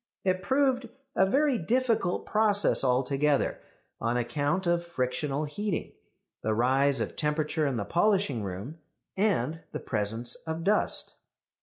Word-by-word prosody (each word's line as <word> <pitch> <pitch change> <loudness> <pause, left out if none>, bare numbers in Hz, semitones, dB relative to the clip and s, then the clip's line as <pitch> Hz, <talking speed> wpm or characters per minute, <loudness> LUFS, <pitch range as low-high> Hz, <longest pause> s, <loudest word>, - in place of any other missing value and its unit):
It 185 -1 +1
proved 265 -2 +1 0.3
a 190 - +4
very 275 +3 +2
difficult 230 -2 0
process 210 -5 +4
altogether, 135 +3 +1 0.4
on 115 +2 0
account 145 +9 -1
of 170 0 +1
frictional 140 -2 -2
heating, 185 +4 -3 0.5
the 110 0 0
rise 135 +4 +2
of - - -3
temperature 150 0 0
in 130 -3 -1
the 100 - -2
polishing 185 - +1
room, 100 - -6 0.4
and 165 - 0
the - - -3
presence 115 +2 -2
of 160 +1 -3
dust. 205 +4 +2
155 Hz, 130 wpm, -28 LUFS, 130-200 Hz, 0.5 s, a